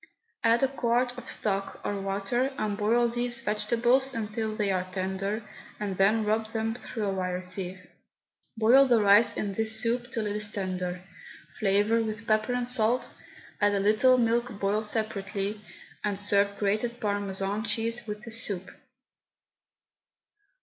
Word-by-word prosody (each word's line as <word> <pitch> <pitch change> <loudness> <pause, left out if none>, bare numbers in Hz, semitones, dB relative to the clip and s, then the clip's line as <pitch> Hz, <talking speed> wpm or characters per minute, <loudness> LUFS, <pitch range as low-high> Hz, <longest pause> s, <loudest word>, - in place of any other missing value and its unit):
Add 230 +2 +4
a - - +5
quart 245 -1 0
of 250 - -9
stock, 195 -1 -2
or 200 -1 -2
water, 200 +7 -1
and 215 -1 -1
boil 230 +3 +2
these 240 0 -1
vegetables 235 +5 +2
until 220 0 -3
they 210 -2 0
are 185 -1 -1
tender, 195 +3 -3 0.3
and 205 -2 -3
then 210 +3 +3
rub 220 +1 -1
them 225 0 -1
through 230 -2 -6
a 200 - 0
wire 180 -1 -2
sieve. 185 0 -5 0.7
Boil 250 +5 +6
the 240 -3 +4
rice 205 +2 +5
in 200 -2 -2
this 220 +2 +2
soup 240 +2 -1
till 225 -2 -2
it 205 0 -2
is 210 -1 +1
tender, 185 -2 -3 0.6
flavour 205 +3 +2
with 220 0 -4
pepper 215 +2 +1
and 245 -1 -1
salt, 245 0 +1 0.5
add 205 0 +3
a - - +1
little 215 +6 +4
milk 235 +1 +1
boiled 205 +2 +1
separately, 210 -1 -2 0.4
and 205 -2 -1
serve 200 0 +2
grated 215 +4 -1
Parmesan 205 -1 -2
cheese 230 +1 -2
with 210 0 -6
the 230 - -7
soup. 200 -4 -2
215 Hz, 150 wpm, -28 LUFS, 200-230 Hz, 0.7 s, Boil